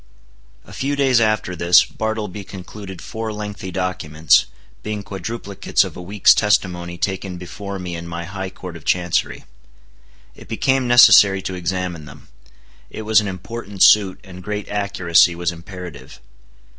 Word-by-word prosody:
A - - -14
few 140 +2 -2
days 135 -4 +3
after 110 -4 0
this, 85 +1 +5
Bartleby 105 -2 -4
concluded 95 0 -10
four 110 0 -5
lengthy 105 -2 -6
documents, 90 -4 +1 0.3
being 105 -1 -5
quadruplicates 100 +1 -2
of - - -9
a - - -8
week's 100 +3 +4
testimony 90 -4 0
taken 95 0 -3
before 100 +3 -7
me 90 -2 -6
in 85 0 -7
my 85 0 -5
High 95 +1 -6
Court 90 -2 -10
of 85 - -11
Chancery. 90 0 0 0.9
It - - -15
became 130 -1 0
necessary 105 -5 +7
to 95 - -4
examine 90 -2 -4
them. 70 - -14 0.6
It 110 - -7
was 110 0 +4
an 105 - -4
important 100 +1 -3
suit, 100 -3 +5
and 90 -2 -11
great 105 +2 -5
accuracy 90 -4 +2
was 85 0 -1
imperative. 85 - -10
95 Hz, 145 wpm, -20 LUFS, 90-105 Hz, 0.9 s, necessary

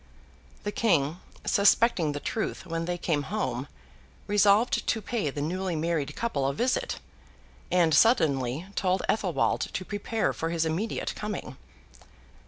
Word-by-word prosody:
The 205 - -2
King, 170 -7 +1 0.3
suspecting 200 -6 +4
the 145 - -3
truth 215 +4 -3
when 165 -1 -3
they 175 0 -2
came 160 -4 0
home, 215 +2 -2 0.6
resolved 205 +3 +3
to 225 - +1
pay 215 -6 -2
the 145 +1 -4
newly 180 +2 -2
married 155 -2 -1
couple 145 -13 -1
a 135 - -1
visit; 250 - 0 0.7
and, 170 -3 +3
suddenly, 150 - +3
told 185 -1 0
Athelwold 190 -6 0
to 185 - -4
prepare 210 +3 -1
for 165 - -3
his 165 -1 0
immediate 175 +8 -2
coming. 205 -11 -5
180 Hz, 135 wpm, -28 LUFS, 155-210 Hz, 0.7 s, suspecting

